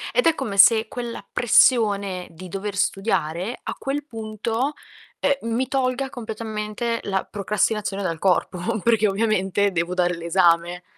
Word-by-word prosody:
Ed - - +4
è 330 - +4
come 200 -8 -4
se 220 +3 +7
quella 240 0 -6
pressione 200 -6 +3
di 175 +3 -11
dover 200 +2 -5
studiare 195 0 -1
a - - -4
quel 280 +2 -4
punto, 225 +2 -3 0.4
ehm, 275 -5 0
mi 255 +2 0
tolga 265 0 -1
completamente 220 0 -4
la 190 -1 -1
procrastinazione 205 0 -1
dal 165 -4 -2
corpo, 185 0 +1 0.2
perchè 225 -2 +3
ovviamente 200 -1 +1
devo 170 0 -1
dare 180 -1 +1
l'esame. 170 0 +2
210 Hz, 135 wpm, -23 LUFS, 185-235 Hz, 0.4 s, se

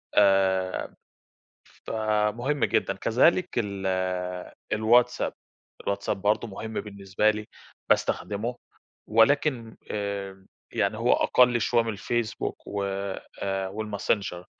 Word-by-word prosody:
آآ، 95 -2 +3 0.9
فمهم 110 +5 0
جدًا. - - +1
كذلك 170 +10 +3
ال 100 -4 -2 0.9
الواتساب، 120 +3 +3 0.5
الواتساب 100 -1 -2
برضه 105 +3 +1
مهم 110 +2 -7
بالنسبة 100 0 0
لي، 105 0 -4 0.4
باستخدمُه 110 +4 0 0.5
ولكن 115 +1 +2
إمم، 100 -2 -4 0.3
يعني 100 +2 0
هو 115 +2 +3
أقَلّ 125 -1 +4
شوية 120 +2 +3
من 115 - -5
الفيسبوك 115 +2 -3
و 100 -1 -3 0.6
آآ، 95 -1 -1
والماسنجر، 100 -3 -2
105 Hz, 95 wpm, -26 LUFS, 100-120 Hz, 0.9 s, أقَلّ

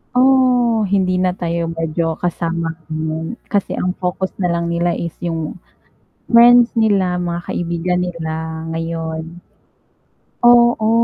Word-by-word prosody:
oh, 250 -3 +4
hindi 185 -1 +1
na 185 0 +2
tayo 170 -1 -2
medyo 165 0 -2
kasama 170 -1 -2 0.2
ngayon, 160 +6 -4
kasi 200 -2 -1
ang 180 0 -1
focus 185 +1 -2
na 180 - +2
lang 170 0 -1
nila 170 0 0
is 170 -1 -4
yung, 165 -1 -4 0.7
friends 240 0 +6
nila 195 -5 +2
mga 175 -1 -3
kaibigan 175 +1 -1
nila 160 -1 -5
ngayon. 165 0 -5 1.1
Oo, 240 -2 +5
175 Hz, 120 wpm, -18 LUFS, 165-200 Hz, 1.1 s, friends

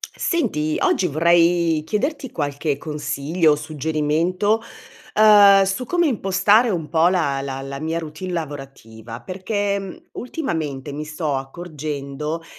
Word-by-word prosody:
Senti, 155 - -1
oggi 185 - +2
vorrei 170 0 +3
chiederti 265 - -2
qualche 145 -1 -2
consiglio, 150 +2 0
o - - +1
suggerimento, 160 - 0 0.5
uhm, 205 -2 +7
su 195 +6 -2
come 345 +2 +2
impostare 210 -1 +3
un 170 -7 -2
po' 165 +1 +3
la 160 -7 +1
la 135 -1 -5
la 135 0 -6
mia 160 +2 -2
routine 160 +3 -6
lavorativa, 135 -8 -7
perché, 200 - -2
mhmm, 195 -2 -8 0.2
ultimamente 160 - -4
mi 150 +2 -5
sto 155 -1 -3
accorgendo 150 +1 -5
160 Hz, 125 wpm, -21 LUFS, 145-195 Hz, 0.5 s, uhm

